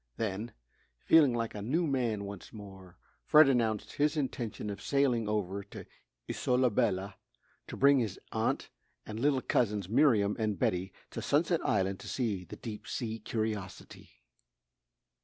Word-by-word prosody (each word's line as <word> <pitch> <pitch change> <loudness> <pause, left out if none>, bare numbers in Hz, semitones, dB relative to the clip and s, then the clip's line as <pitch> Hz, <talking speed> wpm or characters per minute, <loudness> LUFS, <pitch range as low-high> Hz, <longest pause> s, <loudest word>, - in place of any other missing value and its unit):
Then, 110 +1 -3 0.5
feeling 155 -5 +6
like 115 -1 -2
a 105 - -6
new 155 +11 0
man 120 -8 0
once 100 -2 -9
more, 95 -4 -12 0.3
Fred 155 -1 +7
announced 115 -5 0
his 150 +2 +1
intention 120 -6 -3
of 100 0 -7
sailing 125 -6 +1
over 100 -2 -1
to - - -10 0.4
Isola 125 -1 +1
Bella 100 -4 0 0.5
to - - -7
bring 140 0 +5
his 110 -6 -2
aunt - - -1 0.3
and 110 +1 -6
little 135 0 +2
cousins, 105 -5 0
Miriam 105 -3 +3
and 105 -3 0
Betty, 90 +3 0 0.2
to - - -5
Sunset 165 +3 +1
Island 95 -1 0
to - - -10
see 110 -8 -2
the - - -9
deep 110 -3 -8
sea 115 -2 -3
curiosity. 105 -3 -5
110 Hz, 145 wpm, -31 LUFS, 100-130 Hz, 0.5 s, Fred